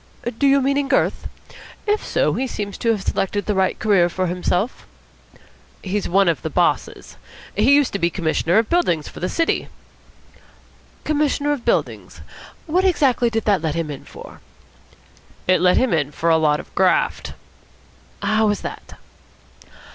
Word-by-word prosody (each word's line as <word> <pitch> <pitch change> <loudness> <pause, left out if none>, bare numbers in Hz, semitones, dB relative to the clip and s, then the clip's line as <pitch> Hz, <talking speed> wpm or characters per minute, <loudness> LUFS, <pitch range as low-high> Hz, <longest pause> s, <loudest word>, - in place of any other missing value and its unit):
"Do 280 - +3
you 275 0 +4
mean 275 +1 +1
in 280 - -2
girth? 270 - 0 0.6
If 420 0 0
so, - - 0
he 265 - -2
seems 205 -4 -5
to 230 - 0
have 215 -4 0
selected 205 +2 -1
the 210 - 0
right 190 -1 +1
career 195 -5 +3
for 185 +2 -2
himself." 180 +5 -2 1.0
"He's 200 +1 -2
one 195 +2 +3
of 165 -4 +1
the - - -4
bosses. - - -1 0.4
He 240 +7 +4
used 285 -3 +2
to 200 - -2
be 170 - +2
Commissioner 170 +1 0
of 225 0 +3
Buildings 175 - +1
for - - -10
the 180 - -2
city." 330 -1 0 1.4
"Commissioner 295 -1 0
of 285 -5 -3
Buildings? - - -2 0.4
What 350 +4 +1
exactly 275 -10 +2
did 225 -1 -2
that 200 -5 +2
let 160 -1 -2
him 165 -3 -2
in 140 - -8
for?" - - -12 1.1
"It 185 0 +3
let 180 0 +4
him 255 -7 +2
in 145 -4 0
for 165 +3 0
a 160 - +5
lot 150 -2 +2
of - - -12
graft." 185 -1 +1 0.9
"How 215 0 +2
was 205 -1 0
that?" - - -8
205 Hz, 165 wpm, -20 LUFS, 175-270 Hz, 1.4 s, a